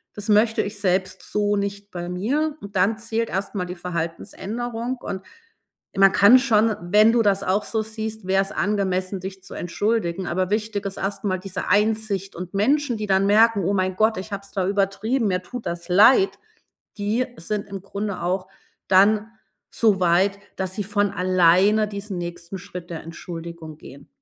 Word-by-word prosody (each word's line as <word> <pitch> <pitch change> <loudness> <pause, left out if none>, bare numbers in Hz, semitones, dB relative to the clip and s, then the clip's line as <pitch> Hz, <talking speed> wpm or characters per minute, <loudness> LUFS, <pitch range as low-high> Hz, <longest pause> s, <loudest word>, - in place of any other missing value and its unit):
Das 205 +1 -6
möchte 220 +2 +4
ich 205 0 -6
selbst 185 -1 0
so 205 0 0
nicht 200 0 -4
bei 175 0 -5
mir.“ 285 +12 -1
Und 200 0 -10
dann 200 +4 +2
zählt 230 0 -2
erstmal 190 0 -2
die 180 - -5
Verhaltensänderung 215 +8 -4
und 190 -2 -5 0.7
man 195 0 +6
kann 205 +6 +7
schon 225 -4 +3
wenn 210 +5 +5
du 235 - +4
das 200 -1 +2
auch 200 +2 +1
so 220 -1 -1
siehst, 220 -2 -6
wär' 190 +1 +3
s 195 - -4
angemessen, 190 -2 -1
dich 190 0 -7
zu 195 - -10
entschuldigen. 190 -1 -1
Aber 185 +2 -1
wichtig 210 -1 -1
ist 195 - -4
erst 195 +1 -3
mal 185 -2 0
diese 185 0 -5
Einsicht 210 -1 +1
und 180 +1 -7
Menschen, 260 +3 +2
die 210 -1 -4
dann 190 0 +3
merken: 215 0 +4
„Oh 200 - +1
mein 185 -1 0
Gott, 220 -1 +3
ich 200 +3 -6
habe 200 0 -4
es 200 - -14
da 190 -1 -1
übertrieben, 205 +5 0
mir 185 -2 0
tut 245 +6 -8
das 170 0 -5
leid“, 230 - +5 0.6
die 215 +5 0
sind 205 +4 -4
im 195 -2 -7
Grunde 200 -2 -4
auch 185 +2 -1 0.4
dann 210 +3 +4 0.4
so 210 -4 +2
weit, 185 +3 +3 0.2
dass 190 -1 -3
sie 205 - -2
von 205 0 +1
alleine 185 +3 +3
diesen 200 -2 -6
nächsten 175 +2 -6
Schritt 175 0 -9
der 165 - -6
Entschuldigung 165 -1 -8
gehen. 140 -2 -13
200 Hz, 180 wpm, -23 LUFS, 185-215 Hz, 0.7 s, kann